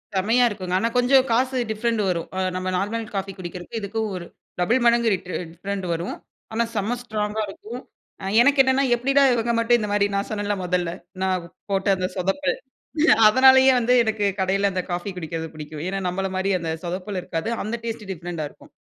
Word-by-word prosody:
செம்மையா 225 +6 +3
இருக்குங்க. 185 -4 -5
ஆனா 230 +3 +1
கொஞ்சம் 255 +1 +5
காசு 255 +3 +2
டிஃப்ரெண்ட் 230 0 0
வரும். 170 -2 -2
அ - - 0 0.2
நம்ம 185 0 -3
நார்மல் 220 +4 -2
காஃபி 195 0 -2
குடிக்கிறதுக்கு 180 +4 -6
இதுக்கும் 220 +2 -2
ஒரு 175 -1 -6 0.3
டபுள் 225 +9 +3
மடங்கு 235 -1 +4
ட் 180 -1 -4 0.3
டிஃப்ரெண்ட் 195 +2 -4
வரும். 170 +2 -3 0.4
ஆனா 230 +1 +2
செம்ம 215 +4 0
ஸ்ட்ராங்கா 215 -2 -2
இருக்கும். 235 +5 -8 0.4
அ - - -6 0.2
எனக்கு 280 +3 +4
என்னென்னா 265 +1 +2
எப்படிடா 270 +4 +2
இவங்க 235 0 0
மட்டும் 235 +1 +4
இந்த 210 - -2
மாரி 205 -1 +3
நான் 200 0 -1
சொன்னேன்ல 205 -1 -1
மொதல்ல? 180 -1 0 0.3
நான் 185 -2 -1 0.2
போட்ட 195 0 0
அந்த 185 0 -1
சொதப்பல். 195 +10 0 0.7
அதனாலேயே 265 +3 +7
வந்து 245 +1 +2
எனக்கு 220 -2 0
கடையில 195 +1 +2
அந்த 185 -1 -1
காஃபி 175 +3 -2
குடிக்கிறது 165 -2 -4
பிடிக்கும். 155 -1 -8
ஏன்னா, 195 +1 -2
நம்மள 195 +2 -1
மாதிரி 190 +1 0
அந்த 165 -1 -3
சொதப்பல் 185 +3 -4
இருக்காது. 165 +3 -3
அந்த 215 +3 -2
டேஸ்ட் 225 -2 -4
டிஃப்ரெண்ட்டா 170 -3 -5
இருக்கும் - - -19
200 Hz, 180 wpm, -23 LUFS, 185-235 Hz, 0.7 s, அதனாலேயே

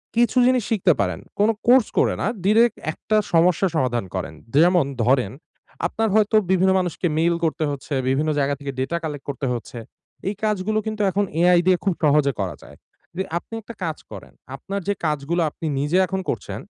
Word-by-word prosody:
কিছু 240 +2 +2
জিনিস 255 -2 +2
শিখতে 190 -6 +3
পারেন, - - -1 0.2
কোনো 210 +2 +4 0.2
কোর্স 250 -1 +6
করে - - +3
না - - 0 0.2
ডিরেক্ট 225 +3 +4
একটা 215 +6 -3 0.2
সমস্যা 175 +3 +4
সমাধান 120 -7 0
করেন। 90 -3 -4 0.2
যে 145 - +4
যেমন 175 -5 +3 0.2
ধরেন, 125 -4 +2 0.6
আপনার 225 +4 -1
হয়তো 215 0 +3 0.2
বিভিন্ন 190 0 +3
মানুষকে 180 -1 -1
মেইল 170 +1 +2
করতে 160 +1 -1
হচ্ছে, 140 +1 -5 0.2
বিভিন্ন 150 +4 +1
জায়গা 140 0 +1
থেকে 140 -1 -5
ডেটা 135 +6 -1
কালেক্ট 150 -3 -5
করতে 135 0 -4
হচ্ছে। 120 0 -7 0.5
এই 205 - -4
কাজগুলো 215 0 0
কিন্তু 215 -1 -3
এখন 205 +2 +1 0.2
AI 180 0 +5
দিয়ে 185 -1 +5
খুব 195 - +1
সহজে 145 -1 +4
করা 95 -6 -2
যায়। - - -14 0.4
দে 190 - -1
আপনি 200 - -9
একটা 230 +2 -11
কাজ 160 -1 -3
করেন, - - -10 0.2
আপনার 195 +9 -5
যে 205 - +2
কাজগুলো 150 +3 -1
আপনি 160 - -9
নিজে 150 +6 +1
এখন 190 +1 -3
করছেন, - - -4
175 Hz, 185 wpm, -22 LUFS, 145-205 Hz, 0.6 s, কোর্স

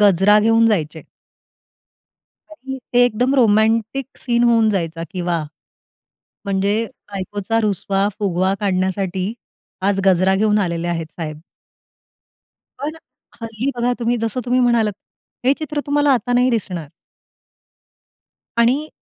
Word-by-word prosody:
गजरा 205 +1 +5
घेऊन 225 +1 +4
जायचे. 160 -7 -1 1.5
अगदी 265 -4 -7
ते 245 0 +5
एकदम 245 +4 +1
रोमॅन्टिक 225 +2 +2 0.2
सीन 240 -1 +1
होऊन 230 -2 +4
जायचा, 165 -4 -2
की 185 -2 -5
वाह! 170 -3 -1 1.0
म्हणजे 200 +1 +1 0.4
बायकोचा 205 +3 -2
रुसवा-फुगवा 195 -1 0
काढण्यासाठी 190 0 -1 0.6
आज 195 - 0
गजरा 190 0 +4
घेऊन 210 +1 +2
आलेले 170 -3 -1
आहेत 165 -2 -2
साहेब. 155 -2 -6 1.4
पण 295 +3 -4 0.5
हल्ली 230 +4 -3
बघा 245 +1 +1
तुम्ही 240 0 0
जसं 225 +3 -1
तुम्ही 250 +1 +2
म्हणालात, 235 -4 +2 0.5
हे 265 - +5
चित्र 300 -1 -3
तुम्हाला 290 -1 +3
आता 245 0 0
नाही 250 +1 +3
दिसणार. 185 - -3 1.7
आणि 265 +7 +2
210 Hz, 115 wpm, -19 LUFS, 190-245 Hz, 1.7 s, गजरा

